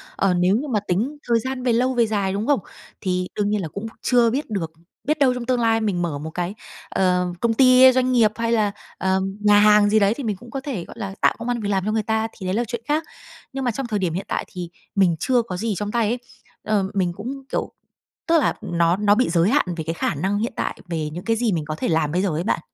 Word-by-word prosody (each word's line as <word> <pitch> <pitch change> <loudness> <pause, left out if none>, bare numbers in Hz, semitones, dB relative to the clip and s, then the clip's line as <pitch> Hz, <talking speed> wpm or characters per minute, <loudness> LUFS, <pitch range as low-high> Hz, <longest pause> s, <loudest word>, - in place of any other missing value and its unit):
Ờ, 195 -2 +2
nếu 180 +3 +3
như 285 +6 -2
mà 220 -5 +1
tính 235 +12 -1
thời 235 -1 +3
gian 260 +1 -4
về 245 -2 +2
lâu 255 +2 +2
về 235 -2 +2
dài, 200 -3 -1
đúng 205 +5 -2
không? 285 -4 +3 0.4
Thì 180 -1 -1
đương 205 -1 0
nhiên 210 -2 0
là 165 - -3
cũng 200 +7 -7 0.2
chưa 240 -2 +4
biết 270 +2 -2
được, 175 -6 -3 0.3
biết 305 +2 0
đâu 265 -3 +4
trong 250 -1 -5
tương 250 0 +1
lai 225 -1 +2
mình 195 -5 0
mở 165 -5 -2
một 155 +2 -6
cái, 175 +2 -3 0.4
ờ, 180 -1 +1
công 230 +2 +1
ty, 255 +1 +7
doanh 255 0 +1
nghiệp, 225 -4 +4
hay 230 0 -1
là, 215 -3 +2 0.3
ờ, 190 +1 +1 0.2
nhà 205 0 +5
hàng 210 0 +6
gì 215 +1 +4
đấy 200 +1 +3
thì 275 +3 -7
mình 210 -3 -1
cũng 240 +5 -14
có 270 - -4
thể, 250 -12 -4
gọi - - -12
là, 195 -2 -5
tạo - - +4
công 235 - -6
ăn 240 - 0
việc 205 -2 -3
làm 195 -1 0
cho 215 - 0
người 220 0 0
ta, 220 +1 0
thì 190 - -7
đấy 185 +2 -1
là 235 - +1
chuyện 235 0 -4
khác. 305 +2 +1 0.5
Nhưng 270 0 -3
mà 245 - +1
trong 255 +2 -4
thời 210 -3 -1
điểm 180 -4 -1
hiện 185 +4 -3
tại - - -2
thì 180 -3 -7 0.3
mình 185 -4 +3
chưa 250 -2 +2
có 190 -6 -6
gì 220 +2 -1
trong 210 +2 -3
tay 230 -3 +1
ấy, 240 +3 -1 0.4
ờ, 210 -2 +1
mình 180 -3 0
cũng 260 +8 -6
kiểu, - - -2 0.6
tức 330 -1 +5
là - - +2
nó 175 -2 +1
nó 205 0 +4
bị 250 -2 +2
giới 170 +3 +3
hạn - - +3
về 160 - -3
cái 165 +1 -3
khả 165 - -1
năng 190 +8 -1
hiện 230 +3 -2
tại, - - -3
về 160 -3 -2
những 170 +4 -7
cái 225 0 +2
gì 230 -1 +1
mình 160 -3 -2
có 155 - -4
thể - - -3
làm 160 -2 +1
bây 180 - +1
giờ 195 - +1
ấy 160 +2 -2
bạn. 210 - 0
210 Hz, 280 wpm, -22 LUFS, 185-240 Hz, 0.6 s, ty